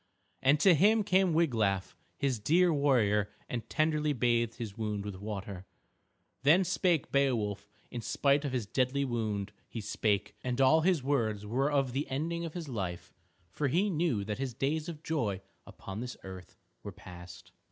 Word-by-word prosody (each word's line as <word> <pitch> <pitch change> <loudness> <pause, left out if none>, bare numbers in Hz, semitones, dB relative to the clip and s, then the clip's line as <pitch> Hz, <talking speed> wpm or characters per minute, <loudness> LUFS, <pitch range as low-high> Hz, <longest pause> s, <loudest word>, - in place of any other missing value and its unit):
And 140 +3 +4
to 190 - +7
him 210 +7 +4
came 190 -2 +3
Wiglaf 110 - +1 0.2
his 135 -5 0
dear 170 - +3
warrior 110 -8 +2 0.2
and 115 -2 -5
tenderly 155 -1 +1
bathed 120 -2 +1
his 110 -5 -6
wound 105 -3 -3
with 100 -2 -5
water. 100 -2 -6 0.7
Then 160 +7 +5
spake 180 -3 +1
Beowulf, 110 -8 0 0.2
in 120 - -4
spite 140 +5 +2
of 140 - -2
his 125 -4 -1
deadly 130 +5 0
wound 110 -5 -2 0.2
he 115 - -5
spake, 105 -1 -1
and 125 0 -2
all 135 +4 +5
his 170 -4 +2
words 110 -7 0
were 135 +7 0
of 135 -3 +1
the 140 +2 -2
ending 165 +5 -2
of 165 - -7
his 170 -3 -5
life, 95 -9 -5 0.4
for 145 - -1
he 185 +9 +1
knew 155 - 0
that 105 +3 -4
his 130 -4 -3
days 155 +4 -1
of 160 -2 -8
joy 115 -14 -1 0.3
upon 95 +2 -8
this 125 +1 -6
earth 95 -2 -10 0.2
were - - -7
past. 90 -1 -12
130 Hz, 170 wpm, -31 LUFS, 105-155 Hz, 0.7 s, to